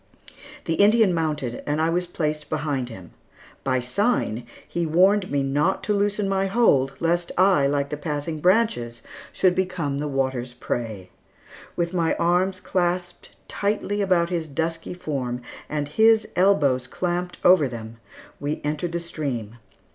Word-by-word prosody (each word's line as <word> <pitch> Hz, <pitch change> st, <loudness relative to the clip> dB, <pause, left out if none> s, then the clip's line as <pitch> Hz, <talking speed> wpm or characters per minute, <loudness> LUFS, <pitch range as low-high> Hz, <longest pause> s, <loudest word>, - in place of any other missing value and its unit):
The 165 Hz, -, 0 dB
Indian 205 Hz, +2 st, +4 dB
mounted 150 Hz, -7 st, -2 dB
and 150 Hz, +1 st, 0 dB
I 160 Hz, +1 st, +2 dB
was 175 Hz, +1 st, 0 dB
placed 150 Hz, -3 st, -3 dB
behind 145 Hz, -5 st, -2 dB
him. 95 Hz, -7 st, -11 dB, 0.5 s
By 130 Hz, -1 st, +1 dB
sign, 125 Hz, -, 0 dB, 0.2 s
he 170 Hz, -, -2 dB
warned 185 Hz, +5 st, +3 dB
me 140 Hz, -1 st, 0 dB
not 145 Hz, +7 st, +1 dB
to 210 Hz, -, 0 dB
loosen 205 Hz, 0 st, 0 dB
my 195 Hz, 0 st, +1 dB
hold, 145 Hz, -, +3 dB
lest 170 Hz, +1 st, 0 dB
I, 185 Hz, -7 st, +4 dB
like 140 Hz, 0 st, 0 dB
the 150 Hz, -, -4 dB
passing 150 Hz, +1 st, -3 dB
branches, 180 Hz, -, +1 dB, 0.3 s
should 185 Hz, -1 st, +3 dB
become 180 Hz, -7 st, -1 dB
the 150 Hz, -, -2 dB
water's 130 Hz, -3 st, -2 dB
prey. 110 Hz, -6 st, -4 dB, 0.6 s
With 170 Hz, +1 st, -1 dB
my 170 Hz, -3 st, +1 dB
arms 180 Hz, +2 st, +1 dB
clasped 175 Hz, -1 st, -2 dB
tightly 205 Hz, 0 st, -1 dB
about 180 Hz, -3 st, +2 dB
his 165 Hz, -3 st, -2 dB
dusky 165 Hz, +4 st, -3 dB
form, 130 Hz, -8 st, -3 dB, 0.3 s
and 150 Hz, -1 st, -2 dB
his 220 Hz, +7 st, +4 dB
elbows 145 Hz, -10 st, +3 dB
clamped 180 Hz, +4 st, -3 dB
over 175 Hz, -6 st, +6 dB
them, 115 Hz, -2 st, -8 dB, 0.4 s
we 145 Hz, +1 st, -2 dB
entered 155 Hz, +3 st, -2 dB
the 170 Hz, -, 0 dB
stream. 135 Hz, -10 st, -4 dB
160 Hz, 145 wpm, -24 LUFS, 140-185 Hz, 0.6 s, over